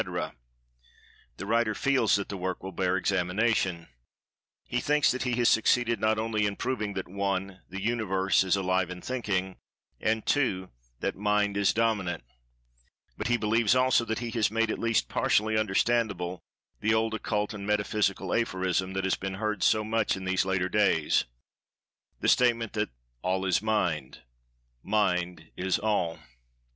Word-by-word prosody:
—the -, -, -6 dB
writer 110 Hz, 0 st, +1 dB
feels 135 Hz, -6 st, +2 dB
that 100 Hz, -1 st, -2 dB
the 100 Hz, -, -5 dB
work 95 Hz, -1 st, -4 dB
will 95 Hz, -, -5 dB
bear 95 Hz, 0 st, 0 dB
examination. 95 Hz, -1 st, 0 dB, 0.8 s
He[Pg 125 Hz, -, -1 dB
158] -, -, -11 dB
thinks 150 Hz, 0 st, +3 dB
that 130 Hz, -, -3 dB
he 125 Hz, -2 st, -1 dB
has 120 Hz, -1 st, +2 dB
succeeded 115 Hz, +1 st, +3 dB
not 110 Hz, 0 st, +2 dB
only 110 Hz, -1 st, 0 dB
in 100 Hz, -, -3 dB
proving 110 Hz, -5 st, -2 dB
that 95 Hz, -1 st, -4 dB
(1) 95 Hz, 0 st, -3 dB
The 95 Hz, +1 st, -6 dB
Universe 95 Hz, -5 st, +1 dB
is 95 Hz, 0 st, +2 dB
Alive 95 Hz, -1 st, 0 dB
and 90 Hz, 0 st, -8 dB
Thinking; 100 Hz, -7 st, -2 dB, 0.4 s
and 110 Hz, 0 st, 0 dB
(2) 95 Hz, -10 st, 0 dB, 0.3 s
That -, -, -1 dB
Mind 105 Hz, 0 st, +1 dB
is 100 Hz, -1 st, +3 dB
Dominant—but -, -, -5 dB
he 120 Hz, 0 st, +2 dB
believes, 115 Hz, +1 st, +2 dB
also, 130 Hz, -1 st, +4 dB
that 110 Hz, -1 st, -2 dB
he 120 Hz, -1 st, -4 dB
has 115 Hz, -2 st, +1 dB
made 115 Hz, +1 st, 0 dB
at -, -, -4 dB
least 115 Hz, -1 st, +1 dB
partially 110 Hz, +1 st, +1 dB
understandable 100 Hz, -3 st, 0 dB, 0.4 s
the 110 Hz, +1 st, +2 dB
old 110 Hz, 0 st, +1 dB
occult 105 Hz, -1 st, -2 dB
and 100 Hz, -1 st, -7 dB
metaphysical 100 Hz, -2 st, 0 dB
aphorism 95 Hz, -4 st, 0 dB
that 95 Hz, 0 st, -2 dB
has 95 Hz, -, +1 dB
been 95 Hz, 0 st, -5 dB
heard 105 Hz, -1 st, -2 dB
so 110 Hz, -1 st, +3 dB
much 110 Hz, -2 st, 0 dB
in 95 Hz, -, -7 dB
these 95 Hz, 0 st, +1 dB
later 95 Hz, -1 st, 0 dB
days—the 80 Hz, -, -2 dB
statement 115 Hz, -3 st, +3 dB
that 105 Hz, -1 st, -1 dB, 0.3 s
"All 95 Hz, +1 st, -1 dB
is 95 Hz, 0 st, +2 dB
Mind—Mind 80 Hz, -, -2 dB
is 95 Hz, 0 st, 0 dB
All." 100 Hz, -6 st, 0 dB
100 Hz, 155 wpm, -28 LUFS, 95-110 Hz, 0.8 s, also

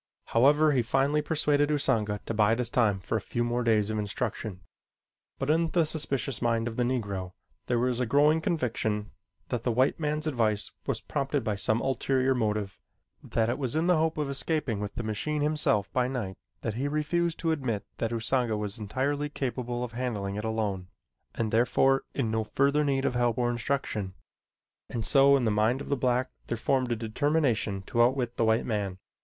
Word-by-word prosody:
However, 150 Hz, +6 st, +5 dB
he 130 Hz, -3 st, +3 dB
finally 135 Hz, +5 st, +1 dB
persuaded 150 Hz, -1 st, +2 dB
Usanga 115 Hz, -8 st, +1 dB
to -, -, -3 dB
bide 110 Hz, +1 st, +3 dB
his 120 Hz, -2 st, -2 dB
time 105 Hz, -6 st, +2 dB
for 110 Hz, -, -1 dB
a -, -, -4 dB
few 120 Hz, +4 st, -2 dB
more 120 Hz, +1 st, 0 dB
days 110 Hz, -2 st, +2 dB
of 110 Hz, -, -1 dB
instruction, 105 Hz, -2 st, -3 dB, 0.8 s
but 135 Hz, +2 st, 0 dB
in 165 Hz, +1 st, +2 dB
the 170 Hz, -1 st, +2 dB
suspicious 135 Hz, -5 st, -2 dB
mind 115 Hz, -1 st, +1 dB
of 115 Hz, -, -4 dB
the 125 Hz, -, -1 dB
Negro 100 Hz, -7 st, -2 dB, 0.3 s
there 120 Hz, -, +1 dB
was 125 Hz, 0 st, 0 dB
a 125 Hz, -, 0 dB
growing 150 Hz, +5 st, +4 dB
conviction 110 Hz, -9 st, -1 dB, 0.4 s
that 120 Hz, -, -1 dB
the 120 Hz, -, 0 dB
white 130 Hz, +7 st, +2 dB
man's 150 Hz, 0 st, -1 dB
advice 110 Hz, -8 st, +1 dB, 0.2 s
was -, -, -1 dB
prompted 140 Hz, -1 st, -2 dB
by 110 Hz, -2 st, 0 dB
some 110 Hz, +3 st, +1 dB
ulterior 135 Hz, 0 st, +1 dB
motive; 105 Hz, -5 st, -1 dB, 0.4 s
that 110 Hz, -1 st, 0 dB
it 120 Hz, +4 st, -1 dB
was 130 Hz, -2 st, -2 dB
in 160 Hz, +2 st, +1 dB
the 180 Hz, -1 st, +4 dB
hope 160 Hz, 0 st, +1 dB
of 150 Hz, -2 st, -1 dB
escaping 140 Hz, -4 st, 0 dB
with 105 Hz, -1 st, -5 dB
the 120 Hz, -, -3 dB
machine 145 Hz, +8 st, -2 dB
himself 150 Hz, -9 st, +1 dB
by 125 Hz, -1 st, +2 dB
night 115 Hz, -8 st, -3 dB, 0.3 s
that 110 Hz, -, -2 dB
he 130 Hz, +6 st, -2 dB
refused 160 Hz, +3 st, 0 dB
to 165 Hz, -, 0 dB
admit 130 Hz, -9 st, -2 dB
that 115 Hz, -, 0 dB
Usanga 115 Hz, 0 st, 0 dB
was 105 Hz, +2 st, -4 dB
entirely 140 Hz, +7 st, -1 dB
capable 125 Hz, -3 st, -3 dB
of 125 Hz, -, -5 dB
handling 115 Hz, -5 st, -3 dB
it 105 Hz, -, -4 dB
alone 105 Hz, -5 st, -2 dB, 0.5 s
and 110 Hz, -2 st, -1 dB
therefore 135 Hz, +4 st, +3 dB
in 120 Hz, -6 st, 0 dB
no 110 Hz, 0 st, 0 dB
further 140 Hz, +6 st, +2 dB
need 135 Hz, -2 st, 0 dB
of -, -, +1 dB
help 120 Hz, -1 st, +1 dB
or 120 Hz, -1 st, +1 dB
instruction, 115 Hz, -6 st, -2 dB, 0.7 s
and 115 Hz, -2 st, -3 dB
so 140 Hz, 0 st, +6 dB
in 125 Hz, -, 0 dB
the 110 Hz, -, +2 dB
mind 110 Hz, +5 st, +2 dB
of -, -, -7 dB
the 140 Hz, -, +2 dB
black 125 Hz, 0 st, 0 dB, 0.2 s
there 120 Hz, -, -2 dB
formed 130 Hz, +1 st, 0 dB
a -, -, +2 dB
determination 115 Hz, -3 st, 0 dB
to 120 Hz, +4 st, 0 dB
outwit 125 Hz, 0 st, +1 dB
the 115 Hz, -, +2 dB
white 110 Hz, +1 st, +2 dB
man. 100 Hz, -5 st, -2 dB
120 Hz, 195 wpm, -28 LUFS, 110-140 Hz, 0.8 s, so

